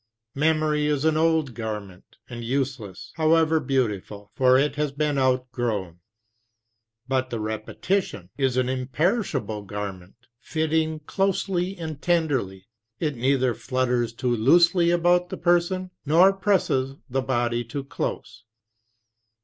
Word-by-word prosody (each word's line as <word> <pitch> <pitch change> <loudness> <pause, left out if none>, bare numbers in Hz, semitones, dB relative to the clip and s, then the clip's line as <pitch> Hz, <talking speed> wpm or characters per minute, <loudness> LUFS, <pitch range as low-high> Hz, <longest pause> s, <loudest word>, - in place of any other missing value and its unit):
Memory 155 0 +1
is 150 0 0
an 160 -1 +3
old 160 -4 +2
garment, 105 -5 -7
and 120 -1 -7
useless, 125 -6 -3
however 160 0 +3
beautiful; 105 -7 -2
for 130 -1 +4
it 140 +1 +2
has 150 -1 -1
been 145 0 0
outgrown. 120 -8 -1 1.1
But 130 -1 0
the 115 - -3
repetition 110 - -3
is 135 -3 0
an 130 -1 +2
imperishable 130 - -1
garment, 100 -2 -7 0.2
fitting 160 +1 -1
closely 190 +2 -1
and 160 -3 -6
tenderly; 135 - 0 0.3
it 150 -4 -1
neither 130 0 +1
flutters 125 -2 -1
too 120 +1 -1
loosely 170 - +4
about 175 +1 +3
the - - -5
person 180 +1 +1
nor 170 +6 +5
presses 185 -9 +1
the 135 0 -1
body 120 -2 0
too 135 +4 -5
close. 110 -4 -5
135 Hz, 120 wpm, -24 LUFS, 120-160 Hz, 1.1 s, nor